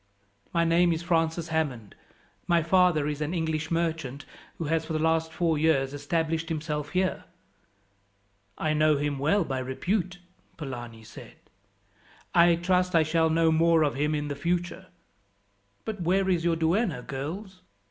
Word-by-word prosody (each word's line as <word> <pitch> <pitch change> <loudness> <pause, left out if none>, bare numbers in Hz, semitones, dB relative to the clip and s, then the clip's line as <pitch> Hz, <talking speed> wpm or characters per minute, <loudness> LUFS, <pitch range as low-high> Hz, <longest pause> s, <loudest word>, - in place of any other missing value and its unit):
"My 170 -1 +2
name 170 +1 +3
is 165 +1 -2
Francis 165 -1 0
Hammond. 140 -10 -2 0.5
My 170 -2 +3
father 175 -3 +3
is 150 0 -3
an 155 +4 -2
English 160 -2 -2
merchant 160 -5 -2 0.3
who - - -4
has, 160 +1 0
for 160 - -5
the - - +1
last 160 +1 +1
four 165 -2 0
years, 145 -4 +2
established 160 +3 -2
himself 150 -2 -3
here." 185 0 0 1.3
"I 155 -1 0
know 155 -1 +3
him 145 -1 -2
well 165 +8 +2
by 135 -4 -3
repute," 180 +8 -2 0.4
Polani 120 -6 -7
said. 110 - -12 1.0
"I 170 0 +6
trust 180 +1 +1
I 165 - +6
shall 160 +1 +2
know 165 0 +3
more 165 0 +4
of 145 - +1
him 150 +2 0
in 145 0 -2
the 145 - -3
future. 175 +4 -2 1.0
"But 215 -4 -5
where 190 +3 +1
is 175 -3 +1
your 170 -1 +2
duenna, 165 - 0
girls?" 180 +9 -6
160 Hz, 155 wpm, -27 LUFS, 150-170 Hz, 1.3 s, I